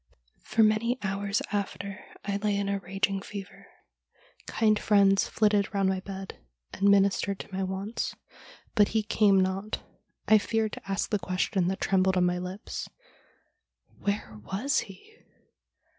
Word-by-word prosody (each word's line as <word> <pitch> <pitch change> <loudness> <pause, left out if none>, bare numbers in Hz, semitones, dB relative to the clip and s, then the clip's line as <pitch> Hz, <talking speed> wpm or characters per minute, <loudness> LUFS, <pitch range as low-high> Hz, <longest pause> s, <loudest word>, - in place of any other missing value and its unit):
' - - -39
For 225 - +5
many 215 +3 +2
hours 200 +1 -1
after 200 -1 -3 0.2
I 200 0 -1
lay 205 0 0
in 200 0 -1
a 200 0 0
raging 195 +1 -1
fever. 200 -1 -9 0.8
Kind 215 -2 +2
friends 200 -2 +4
flitted 210 -2 +2
round 195 -1 +3
my 190 0 0
bed 195 0 -8 0.3
and 200 - +3
ministered 200 0 +3
to 195 - -10
my 190 - -2
wants, 190 +4 -3 0.6
but 205 -3 +5
he 215 - +2
came 210 -2 +4
not. 190 +3 -1 0.4
I 215 0 +7
feared 220 0 -1
to - - -9
ask 195 - -1
the 210 - +2
question 185 0 0
that 190 +1 -2
trembled 190 -1 +2
on 180 - +4
my 180 0 +1
lips 185 +3 -6 0.6
— - - -36
Where 200 - -2
was 255 - 0
he 415 - -10
200 Hz, 155 wpm, -28 LUFS, 190-210 Hz, 0.8 s, I